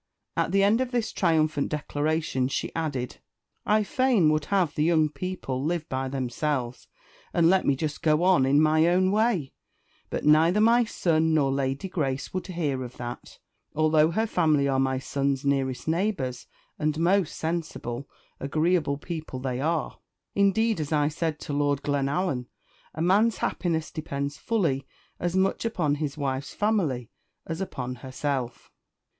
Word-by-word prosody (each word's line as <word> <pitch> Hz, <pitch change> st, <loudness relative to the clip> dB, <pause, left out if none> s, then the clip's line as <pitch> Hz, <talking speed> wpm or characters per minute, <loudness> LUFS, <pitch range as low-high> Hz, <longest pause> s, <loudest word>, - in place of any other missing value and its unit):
At -, -, 0 dB
the 195 Hz, +1 st, +3 dB
end 215 Hz, +5 st, +4 dB
of 260 Hz, -, -1 dB
this 240 Hz, -3 st, -1 dB
triumphant 155 Hz, -5 st, +1 dB
declaration, 150 Hz, -2 st, -1 dB
she 135 Hz, -, -3 dB
added 145 Hz, -7 st, -3 dB, 0.5 s
"I 215 Hz, 0 st, +4 dB
fain 230 Hz, -, +3 dB
would 155 Hz, -1 st, 0 dB
have 185 Hz, -6 st, +1 dB
the 150 Hz, -, 0 dB
young 160 Hz, -2 st, +3 dB
people 150 Hz, -6 st, -4 dB
live 165 Hz, +1 st, -1 dB
by 130 Hz, 0 st, -2 dB
themselves, 130 Hz, -1 st, -2 dB, 0.5 s
and 170 Hz, 0 st, +5 dB
let 190 Hz, -1 st, +2 dB
me 140 Hz, -, +4 dB
just 150 Hz, +2 st, -4 dB
go 155 Hz, +1 st, +3 dB
on 180 Hz, -6 st, +5 dB
in 135 Hz, +2 st, +4 dB
my 155 Hz, +1 st, +4 dB
own 185 Hz, +2 st, +3 dB
way; 210 Hz, -, +1 dB, 0.6 s
but -, -, -3 dB
neither 160 Hz, +6 st, +5 dB
my 230 Hz, +2 st, +5 dB
son 160 Hz, -6 st, +1 dB
nor 140 Hz, -3 st, +2 dB
Lady 135 Hz, +4 st, -1 dB
Grace 140 Hz, -7 st, -2 dB
would 185 Hz, -, -3 dB
hear 155 Hz, -8 st, -2 dB
of 125 Hz, 0 st, -9 dB
that, 120 Hz, 0 st, -7 dB, 0.4 s
although 155 Hz, 0 st, +4 dB
her 220 Hz, +7 st, 0 dB
family 155 Hz, -9 st, +2 dB
are 135 Hz, -1 st, +1 dB
my 130 Hz, 0 st, +1 dB
son's 140 Hz, 0 st, -1 dB
nearest 135 Hz, -1 st, 0 dB
neighbours, 160 Hz, -8 st, -1 dB, 0.3 s
and 150 Hz, 0 st, 0 dB
most 175 Hz, +1 st, +2 dB
sensible, 155 Hz, -6 st, -4 dB, 0.3 s
agreeable 155 Hz, +1 st, +1 dB
people 160 Hz, -3 st, -6 dB
they 130 Hz, -1 st, -3 dB
are. 160 Hz, +2 st, -1 dB, 0.3 s
Indeed, 205 Hz, +1 st, +2 dB
as 150 Hz, -1 st, -3 dB
I 150 Hz, -1 st, +2 dB
said 155 Hz, -1 st, -2 dB
to 145 Hz, -, -5 dB
Lord 145 Hz, -1 st, 0 dB
Glenallan, 140 Hz, -1 st, -1 dB, 0.5 s
a 160 Hz, -, -2 dB
man's 205 Hz, +6 st, +3 dB
happiness 160 Hz, -3 st, -1 dB
depends 140 Hz, -2 st, -4 dB
fully 145 Hz, -12 st, 0 dB, 0.3 s
as 175 Hz, +1 st, -1 dB
much 190 Hz, +1 st, +1 dB
upon 180 Hz, -11 st, 0 dB
his 145 Hz, -1 st, -3 dB
wife's 135 Hz, -1 st, -3 dB
family 170 Hz, -, 0 dB, 0.3 s
as 165 Hz, +2 st, -4 dB
upon 125 Hz, -9 st, -4 dB
herself." 130 Hz, -1 st, -4 dB
155 Hz, 155 wpm, -26 LUFS, 140-180 Hz, 0.6 s, and